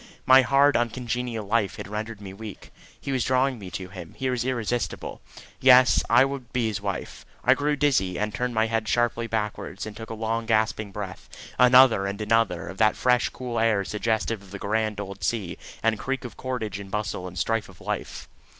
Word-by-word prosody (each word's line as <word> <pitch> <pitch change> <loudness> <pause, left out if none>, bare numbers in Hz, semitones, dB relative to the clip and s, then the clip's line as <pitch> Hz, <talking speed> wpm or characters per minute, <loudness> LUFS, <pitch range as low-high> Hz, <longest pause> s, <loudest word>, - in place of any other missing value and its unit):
My 130 +1 +8
hard 140 +2 +4
uncongenial 120 -1 -2
life 105 -1 0
had - - -7
rendered 105 +1 -5
me 95 -2 -8
weak. 105 0 -10 0.3
He 140 - -5
was 130 -3 +1
drawing 130 -1 +1
me 95 -3 -8
to 95 0 -6
him; 90 -4 -10
he 130 -1 -1
was 125 -1 -1
irresistible. 120 -2 -2 0.4
Yes; 130 -1 +6
I 120 +3 +6
would 135 -3 -6
be 125 -2 0
his 105 -2 -4
wife. 100 -4 -5 0.2
I 130 - +6
grew 145 +2 0
dizzy, 125 -12 +1
and 105 0 -2
turned 125 -1 -2
my 110 0 +3
head 110 -1 -1
sharply 120 0 +1
backwards 105 -2 -3
and 110 -1 -8
took 115 0 -9
a 110 - -5
long 115 +1 -2
gasping 110 -2 +1
breath, 95 -2 -7 0.3
another 125 -5 +6
and 100 +1 -4
another, 105 -6 +1
of 95 - -8
that 110 -1 +4
fresh 125 -1 +2
cool 120 -2 -4
air 110 -3 +2
suggestive 110 +1 -1
of 100 - -16
the 100 - -7
grand 110 +1 -1
old 100 -2 -7
sea 95 -1 -1 0.3
and 110 -1 +2
creak 135 -1 -3
of 120 - -8
cordage 115 -6 -4
and 100 -1 -9
bustle 105 -3 -3
and 90 0 -10
strife 115 -2 -1
of 95 - -16
life. - - -5
110 Hz, 200 wpm, -25 LUFS, 100-125 Hz, 0.4 s, My